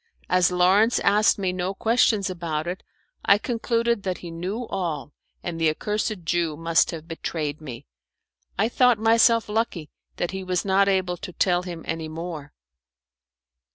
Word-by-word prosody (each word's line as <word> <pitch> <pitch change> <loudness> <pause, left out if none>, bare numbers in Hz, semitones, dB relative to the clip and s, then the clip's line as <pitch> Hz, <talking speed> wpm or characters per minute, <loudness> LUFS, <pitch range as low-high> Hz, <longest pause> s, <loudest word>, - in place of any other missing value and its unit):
As 180 -1 +4
Lawrence 190 +6 +4
asked 210 +2 +4
me 190 -2 -1
no 185 +2 -3
questions 220 -2 +2
about 165 -4 -3
it, 180 +3 -4 0.4
I 200 - +5
concluded 235 0 0
that 185 -2 -3
he 170 - -9
knew 190 +8 -4
all, 160 - -4 0.3
and 165 -2 -4
the 160 - +4
accursed 210 +3 -2
Jew 165 -3 0
must 165 0 +2
have 160 -1 -7
betrayed 155 -2 -4
me. 125 -6 -8 0.7
I 210 +4 +2
thought 245 -1 +3
myself 230 +1 +4
lucky 210 -8 -2 0.2
that 175 - -2
he 190 0 -5
was 185 0 -1
not 195 0 +3
able 185 -2 +1
to 180 - -8
tell 180 0 +2
him 175 -2 -7
any 165 -1 -3
more. 160 -2 -7
180 Hz, 155 wpm, -24 LUFS, 165-210 Hz, 0.7 s, I